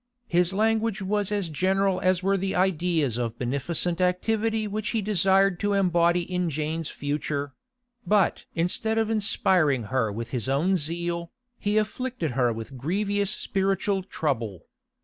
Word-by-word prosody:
His 175 -3 +2
language 220 0 +1
was 205 +1 0
as 200 -4 0
general 190 +4 +1
as 185 -1 +2
were 195 +1 +2
the 195 0 -1
ideas 170 - +1
of 115 -2 -3
beneficent 165 +7 -1
activity 220 +4 +1
which 210 +1 -3
he - - +1
desired 195 -2 +3
to 205 0 0
embody 175 -2 +3
in 180 0 -2
Jane's 155 +1 -3
future; 145 -1 -3 0.5
but 205 -3 +2
instead 200 +6 +1
of 225 0 +1
inspiring 180 - +2
her 120 -5 +1
with 115 +3 -6
his 125 -1 -1
own 160 +8 +2
zeal, 170 +1 -2 0.3
he 205 0 0
afflicted 215 - -1
her 125 -1 +2
with 115 +4 -7
grievous 200 - 0
spiritual 195 -1 0
trouble. 120 - -3
180 Hz, 145 wpm, -26 LUFS, 150-200 Hz, 0.5 s, desired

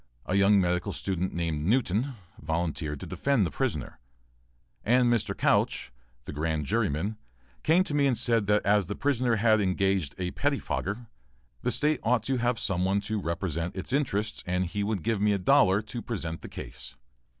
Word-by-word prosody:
A - - -2
young 100 +1 +5
medical 90 -1 0
student 95 -1 -2
named 80 -3 -2
Newton, 120 - +1 0.3
volunteered 80 -4 -2
to - - -5
defend 135 -8 +1
the - - -3
prisoner, 90 - -3 0.8
and 120 +1 +4
Mr. 115 - -1
Couch, - - +1 0.3
the - - -7
grand 75 0 -1
juryman, 105 +2 0 0.4
came 170 +4 +4
to 155 - -4
me 145 -1 +3
and 125 -4 +1
said 115 -4 +2
that 105 0 +2
as 100 -2 +3
the 100 - -3
prisoner 125 -4 +1
had 110 0 +3
engaged 95 -5 0
a 90 -1 -2
pettifogger, 125 -5 -2 0.6
the - - 0
State 150 -1 +1
ought 115 -1 +2
to 130 +2 0
have 120 0 +1
some 95 -5 0
one 95 +2 +2
to 105 0 -3
represent 85 0 -2
its 95 +6 -4
interests 110 -7 0
and 90 +1 0
he 100 +4 -2
would 100 -3 -2
give 110 -2 0
me 105 0 +3
a - - +1
dollar 100 -1 +4
to 115 +2 -6
present 85 -10 -4
the - - -9
case. - - -8
100 Hz, 180 wpm, -28 LUFS, 90-120 Hz, 0.8 s, young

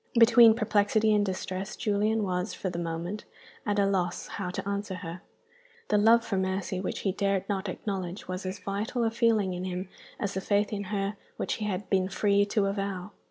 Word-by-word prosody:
Between 230 -1 +8
perplexity 215 -1 +2
and 205 -1 +3
distress 190 0 -3
Julian 215 0 +1
was, 180 +1 -2
for 185 - -3
the 170 - -4
moment, 170 +5 -3 0.4
at 205 0 +1
a 200 - +4
loss 180 -3 0
how 185 -3 -4
to 180 - -4
answer 200 -1 -2
her. 175 -1 -7 0.7
The 210 - +4
love 230 +3 +5
for 205 -4 -1
Mercy 190 0 -1
which 185 - -3
he 195 - +1
dared 195 0 0
not 200 -1 -2
acknowledge 190 -1 -4
was 185 +1 -4
as 185 +1 -4
vital 210 +5 -2
a 225 - +2
feeling 225 -5 +2
in 180 +1 -4
him 185 0 -4 0.3
as 200 -3 -2
the 190 - -2
faith 205 +2 +1
in 200 -1 -3
her 200 +1 -2 0.2
which - - -1
he - - 0
had 205 -1 -2
been 190 -1 +2
free 200 0 +3
to 205 0 +1
avow. 195 -1 -3
200 Hz, 200 wpm, -28 LUFS, 185-210 Hz, 0.7 s, Between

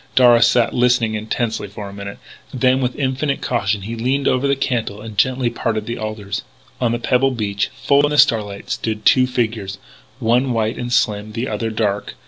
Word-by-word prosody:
Darragh 120 -2 +6
sat 120 0 +3
listening 125 -2 +2
intently 110 0 -2
for 100 +1 -8
a 100 - -9
moment. 100 0 -7 0.3
Then 130 +1 +2
with 125 -1 -1
infinite 135 +1 -1
caution, 105 -4 -1
he 115 +4 -5
leaned 130 +4 0
over 130 +2 +2
the 140 - +2
cantle 115 -6 -2
and 110 0 -9
gently 125 +3 +1
parted 110 -2 -2
the 120 +2 -4
alders. 110 -2 -4 0.4
On 120 -2 +2
the 120 - 0
pebbled 130 +1 +1
beach, 100 -2 -1
full 140 0 +4
in - - 0
the 150 - -1
starlight, 105 -7 +2
stood 110 -1 -3
two 130 -1 +5
figures, 110 -6 -2 0.4
one 125 +1 +1
white 110 0 -1
and 120 0 -4
slim, 105 -3 0
the 120 +3 -2
other 110 +1 -2
dark. 105 -2 -2
115 Hz, 190 wpm, -19 LUFS, 105-125 Hz, 0.4 s, Darragh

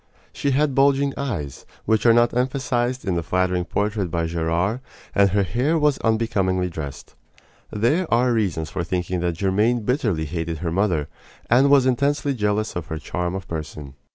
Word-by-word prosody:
She 140 - -1
had 140 +1 +2
bulging 140 +1 +3
eyes 90 - -4 0.2
which 110 +1 +2
are - - +8
not 120 +1 +4
emphasized 125 -1 -1
in 95 - 0
the 85 - 0
flattering 90 +1 0
portrait 105 -1 -1
by 85 0 -1
Gerard 85 +7 -1 0.3
and 100 0 +4
her 100 +1 +2
hair 125 - 0
was 150 -3 +2
unbecomingly 95 -5 0
dressed. 75 -4 -7 0.6
There 145 - 0
are 120 +1 +3
reasons 90 -8 -1
for 85 - -2
thinking 90 +1 -2
that 85 -1 -2
Germaine 105 +6 +1
bitterly 105 - 0
hated 80 +1 -3
her 85 0 -3
mother, 85 -5 0 0.4
and 130 +4 +5
was 140 -2 +5
intensely 140 +2 +1
jealous 105 -2 -1
of 85 -2 -4
her 80 - -4
charm 90 +3 -3
of 95 -2 -6
person. 75 -3 -6
105 Hz, 170 wpm, -22 LUFS, 85-125 Hz, 0.6 s, are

